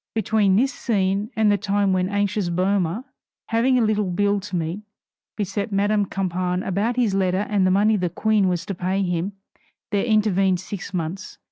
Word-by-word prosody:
Between 215 -3 +2
this 260 +6 +2
scene 200 -2 0
and 220 -1 +3
the 205 - +1
time 200 -1 +1
when 185 0 +1
the - - -6
anxious 205 -2 0
Boehmer, 185 +3 0 0.5
having 240 +3 +2
a 240 - +3
little 210 -3 +1
bill 205 +3 +1
to 195 -1 -6
meet, 170 +4 -2 0.6
beset 205 +1 -3
Madame 205 +1 +1
Campan 180 -1 -2
about 205 +6 0
his 235 -5 +1
letter 190 +1 +1
and 200 -3 +2
the - - +3
money 210 +3 +3
the 180 -2 -1
Queen 210 +3 +1
was 180 -1 -1
to 200 - -4
pay 185 +2 -1
him, 180 +2 -2 0.6
there 200 -1 +1
intervened 195 -5 +2
six 190 +1 -7
months. 180 +1 -5
200 Hz, 180 wpm, -23 LUFS, 185-210 Hz, 0.6 s, and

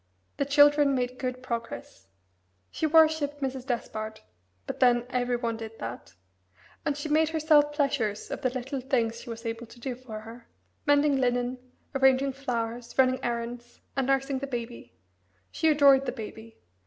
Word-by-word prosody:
The 280 - +1
children 290 0 +5
made 250 0 -2
good 255 -1 -4
progress. 230 - -6 0.6
She 315 - 0
worshipped 310 -2 +4
Mrs. 265 -1 -4
Despard 220 -3 -4 0.4
but - - -5
then 240 -1 +4
every 245 -1 0
one 235 -2 -2
did 225 0 -8
that 115 -6 -7 0.7
and 290 - -1
she 295 - -4
made 310 +1 +3
herself 305 -2 +4
pleasures 275 -8 -1
of - - -4
the 255 - +2
little 260 +2 -4
things 235 -3 0
she 245 - -11
was 230 +1 -7
able 230 +1 -4
to 240 - -15
do 255 +1 -3
for 240 -4 -8
her 230 +2 -12 0.4
mending 290 -1 +4
linen, 245 0 0 0.3
arranging 265 0 +3
flowers, 240 -3 -4
running 260 -1 +3
errands, 240 0 -4 0.2
and 270 -1 0
nursing 270 0 +1
the 275 - -4
Baby. 235 - -6 0.6
She 320 - 0
adored 280 -3 +5
the - - 0
Baby. 220 +1 -9
255 Hz, 160 wpm, -28 LUFS, 235-280 Hz, 0.7 s, children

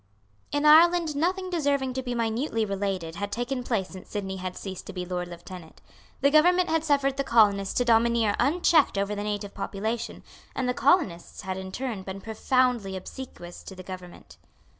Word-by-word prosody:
In 290 +1 0
Ireland 325 0 +6
nothing 370 +5 -1
deserving 280 -6 0
to 260 - -2
be 245 -1 -4
minutely 230 0 0
related 195 -5 -3
had 205 +1 -3
taken 250 +2 -2
place 220 -7 -1
since 185 -1 -11
Sidney 195 -2 -4
had 185 -1 -5
ceased 190 -2 -7
to - - -7
be 180 -1 -4
Lord 180 0 -3
Lieutenant. 175 -1 -11 0.4
The 280 - +4
government 355 +4 +5
had 320 -1 +1
suffered 280 -3 +1
the 275 - +1
colonists 205 -6 +3
to 245 - +2
domineer 230 -2 +3
unchecked 320 - +3
over 200 +1 0
the 205 0 -3
native 205 -1 -3
population; 220 +4 -4 0.3
and 260 - -1
the 250 - +1
colonists 260 - +1
had 185 0 -4
in 190 0 -6
return 230 +1 -4
been 190 +1 -7
profoundly 225 -1 0
obsequious 185 -4 -9
to 190 - -10
the 185 - -9
government. 185 -1 -10
225 Hz, 180 wpm, -26 LUFS, 190-275 Hz, 0.4 s, Ireland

